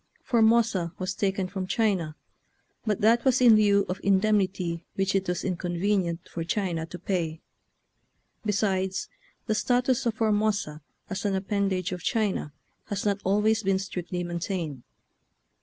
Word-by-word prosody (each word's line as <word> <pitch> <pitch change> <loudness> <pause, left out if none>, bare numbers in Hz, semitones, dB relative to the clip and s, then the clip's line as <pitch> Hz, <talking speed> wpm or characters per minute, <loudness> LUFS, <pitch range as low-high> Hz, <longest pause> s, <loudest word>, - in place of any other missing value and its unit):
Formosa 225 -7 +3
was 185 +1 -2
taken 195 -2 -1
from 185 0 -4
China, 190 -8 0 0.7
but 210 -2 0
that 230 +3 +4
was 260 -2 +3
in 240 -3 +7
lieu 200 -2 +4
of 180 - -4
indemnity 190 -4 +1
which 195 0 0
it 195 -1 0
was 180 0 -1
inconvenient 175 -1 -1
for 165 - -5
China 170 -2 -2
to 180 - -8
pay; 165 -5 -2 1.0
besides, 190 -3 0 0.4
the 215 - +1
status 245 +2 +1
of 225 - 0
For 220 -1 +1
mosa 205 -8 0 0.3
as 195 - -4
an 200 -2 +1
appendage 190 -2 -1
of 180 -1 -4
China 205 -9 0 0.3
has 205 0 -4
not 200 -1 +1
always 210 +3 +2
been 195 -2 +2
strictly 180 -2 -4
maintained. 170 -5 -3
195 Hz, 140 wpm, -27 LUFS, 180-215 Hz, 1.0 s, in